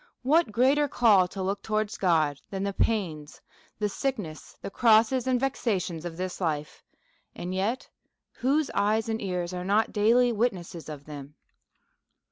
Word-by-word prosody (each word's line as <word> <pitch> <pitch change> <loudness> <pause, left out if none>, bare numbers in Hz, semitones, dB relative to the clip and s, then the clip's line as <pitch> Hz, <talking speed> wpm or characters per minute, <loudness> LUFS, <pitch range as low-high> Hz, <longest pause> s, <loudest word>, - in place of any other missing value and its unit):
What 305 0 +3
greater 270 +6 +3
call 210 -9 +4
to 190 +1 -6
look 195 +1 -2
towards 215 -1 -1
God 155 -6 +2
than 195 -1 -4
the 200 0 -2
pains, 170 -10 -1 0.4
the 210 - 0
sickness, 205 - -4
the - - -7
crosses, 230 +3 +4
and 255 -1 +2
vexations 195 - -2
of 165 -1 -6
this 185 +1 -4
life, 150 -3 -2 0.5
and 180 +1 -5
yet 210 +7 -1 0.5
Avhose 275 +3 +1
eyes 215 +2 +1
and 225 0 -2
ears 180 -2 -3
are 180 0 -4
not 205 +4 +1
daily 235 +3 +4
wit^ 235 +3 +2
nesses 170 -3 -9
of 145 -2 -8
them 145 -1 -9
200 Hz, 155 wpm, -27 LUFS, 175-235 Hz, 0.5 s, call